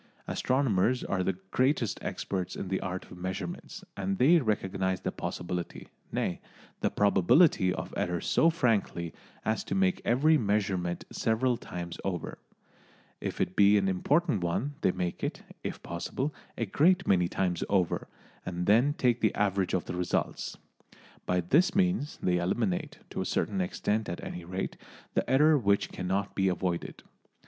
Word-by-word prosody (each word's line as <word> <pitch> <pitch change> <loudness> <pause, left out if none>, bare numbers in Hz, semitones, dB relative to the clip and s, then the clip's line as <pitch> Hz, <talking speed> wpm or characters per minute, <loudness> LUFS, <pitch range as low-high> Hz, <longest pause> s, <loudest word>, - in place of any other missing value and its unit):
Astronomers 125 -2 +1
are 95 -1 -1
the 90 0 -1
greatest 130 -4 +1
experts 95 -2 -3
in 95 - -5
the 95 - 0
art 95 0 -5
of 90 - -10
measurement, 95 -1 -5
and 95 0 -2
they 160 +7 +6
recognise 95 - -1
the - - -2
possibility, 90 0 -5 0.2
nay, - - -1 0.4
the - - +1
probability, 105 - +4
of - - -5
error 90 -1 -1
so 165 - +3
frankly 110 - 0 0.3
as 110 0 0
to - - -2
make 190 -1 +2
every 150 +6 +4
measurement 95 -5 0
several 120 +3 +1
times 85 -6 -7
over; 90 -4 -3 0.8
if - - -4
it 90 - -1
be 100 0 +6
an 95 -1 +2
important 135 - +1
one 115 +12 -1
they - - +3
make 90 -1 -3
it, - - -3 0.2
if - - -5
possible, 130 - -3 0.2
a 115 - 0
great 175 - +3
many 90 -2 +4
times 90 -1 -1
over, 95 -4 +1 0.4
and 90 -1 -3
then 120 +9 +4
take 120 -2 +2
the 110 - +2
average 100 -3 +1
of 90 - -1
the - - -5
results. 90 0 -2 0.7
By 90 0 +2
this 165 - +3
means 180 -6 +1
they 90 -1 +2
eliminate, 90 +2 -1
to - - -3
a - - 0
certain 100 -3 0
extent 105 +4 -1
at 85 - -5
any 90 -1 -6
rate, 95 +2 -4 0.4
the - - 0
error 150 +3 +5
which 100 -3 +2
cannot 95 +2 -2
be 95 -1 +1
avoided. 90 -1 -2
100 Hz, 155 wpm, -29 LUFS, 90-125 Hz, 0.8 s, they